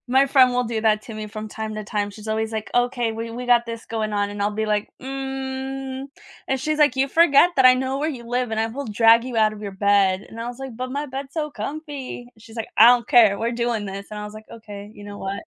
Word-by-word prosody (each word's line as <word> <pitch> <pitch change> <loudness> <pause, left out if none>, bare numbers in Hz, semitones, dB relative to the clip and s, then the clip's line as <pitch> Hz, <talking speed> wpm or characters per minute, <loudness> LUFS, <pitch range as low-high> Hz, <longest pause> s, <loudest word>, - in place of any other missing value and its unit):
My 265 +2 +4
friend 260 -2 +5
will 250 0 +1
do 225 -2 -3
that 215 -1 +2
to 225 - -9
me 215 0 -6
from 215 0 -7
time 215 0 -6
to 215 - -5
time, 205 0 -2
she's 210 +1 -11
always 220 +1 -1
like, 220 -1 -4
"Okay, 245 -1 +1
we 225 +1 -5
we 245 +2 -6
got 240 -1 +4
this 230 -1 -7
going 220 -2 -3
on," 205 0 0
and 205 0 -5
I'll 205 - +2
be 220 +1 -2
like, 210 -1 -1
"Mm," 265 0 -5 0.4
and 265 - 0
she's 305 +3 -1
like, 290 -4 +4
"You 265 +1 +2
forget 330 +2 +5
that 265 - +4
I 255 0 +8
know 260 +1 -2
where 305 +2 0
you 255 -6 -7
live 245 0 -1
and 220 - -1
I 220 - +2
will 270 +4 -6
drag 225 +2 +5
you 250 -2 -4
out 215 -1 +3
of 210 - -11
your 205 -1 -5
bed," 195 -1 +2
and 225 - -11
I 235 - -4
was 245 0 -7
like, 265 -3 -7
"But 255 +2 -5
my 285 +2 -2
bed's 270 0 -7
so 300 -2 -3
comfy," 285 -5 -6
she's 225 +1 -15
like, 225 - -4
"I 225 - +9
don't 245 -1 +4
care, 225 -7 +6
we're 230 +1 -1
doing 235 -3 -1
this," 195 0 -7
and 210 - -6
I 210 - -5
was 210 - -9
like, 215 0 -11
"Okay, 210 -2 -10
you 205 - -12
know 205 0 -9
what" 195 +6 -4
230 Hz, 275 wpm, -22 LUFS, 215-265 Hz, 0.4 s, I